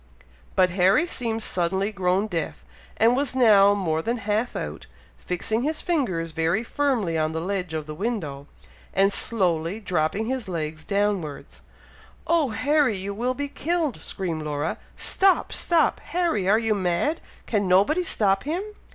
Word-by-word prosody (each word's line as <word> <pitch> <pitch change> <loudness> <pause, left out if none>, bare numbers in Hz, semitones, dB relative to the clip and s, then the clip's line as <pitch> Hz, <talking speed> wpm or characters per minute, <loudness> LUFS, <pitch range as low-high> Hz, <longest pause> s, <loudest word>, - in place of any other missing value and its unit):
But 185 -1 +4
Harry 190 - +3
seemed 230 -9 -2
suddenly 190 +3 0
grown 190 0 +1
deaf, 170 -7 -4 0.3
and 230 +2 +4
was 275 -1 -1
now 205 -5 +6
more 160 -5 -1
than 235 +7 -1
half 220 +2 -1
out - - -5 0.3
fixing 215 +6 -1
his 305 +4 -1
fingers 190 - -1
very 165 +7 0
firmly 235 - 0
on 155 0 0
the 160 - -2
ledge 180 -1 -3
of 155 -1 -3
the 155 - -7
window, 155 -8 -4 0.5
and 195 +1 +4
slowly 180 -3 +1
dropping 185 +1 -1
his 255 -1 -3
legs 155 -3 -4
downwards. 200 -7 -2 0.6
"Oh 330 -5 +2
Harry! 280 -1 +2
you 195 +2 -4
will 245 +5 -1
be 285 +1 -3
killed!" 320 -1 -2
screamed 170 -5 -4
Laura. 150 +1 -3 0.2
"Stop! 385 -1 +2
stop! 340 -2 +2
Harry, 330 - -1
are 215 - +5
you 225 -1 +1
mad? 190 - 0 0.2
can 205 -4 0
nobody 200 - +4
stop 195 - +2
him?" 330 +7 -2
200 Hz, 150 wpm, -24 LUFS, 175-245 Hz, 0.6 s, now